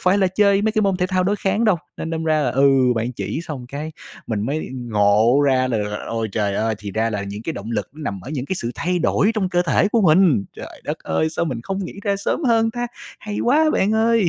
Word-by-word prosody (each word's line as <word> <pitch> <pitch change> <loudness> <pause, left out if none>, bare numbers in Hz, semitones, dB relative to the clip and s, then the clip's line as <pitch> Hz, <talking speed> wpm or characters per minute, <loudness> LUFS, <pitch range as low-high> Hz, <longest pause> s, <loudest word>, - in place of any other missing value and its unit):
phải 185 +2 +3
là 190 - +3
chơi 200 +1 +3
mấy 220 - +1
cái 215 -1 +1
môn 195 -2 +2
thể 180 0 0
thao 185 -1 0
đối 205 +2 +1
kháng 205 +3 0
đâu, 210 -5 +4 0.2
nên 165 - -5
đâm 160 0 -3
ra 155 -1 +2
là, - - +1
ừ, 140 +1 +4 0.3
bạn 115 +3 -1
chỉ 140 - -4
xong 135 -7 -7
cái 150 +4 -6 0.3
mình 110 -3 -2
mới 145 +7 -2
ngộ 115 +1 +3
ra 130 -1 +2
là 115 -3 0 0.3
ôi 115 -1 -2
trời 100 -3 0
ơi, 110 +1 0
thì 105 -1 -6
ra 115 +2 0
là 105 -2 -2
những 100 +2 -6
cái 165 - -3
động 110 -4 -7
lực 105 -4 -2
nằm 120 -12 -5
ở 135 - -8
những 140 -3 -3
cái 190 - -2
sự 120 -6 -3
thay 180 +1 -1
đổi 200 +5 +2
trong 195 -4 0
cơ 175 -1 +1
thể 175 +5 +2
của 230 +1 +2
mình. 160 - +4
Trời - - -10
đất - - -3
ơi, 120 - -1
sao 170 - -1
mình 125 -7 -3
không 195 +4 -3
nghĩ - - -7
ra 200 -1 0
sớm 235 +9 -2
hơn 225 -2 +3
ta? 240 +1 -3 0.3
Hay 210 -1 -5
quá 305 +5 +3
bạn 205 +3 +2
ơi. 225 -4 +3
160 Hz, 260 wpm, -21 LUFS, -, 0.3 s, đâu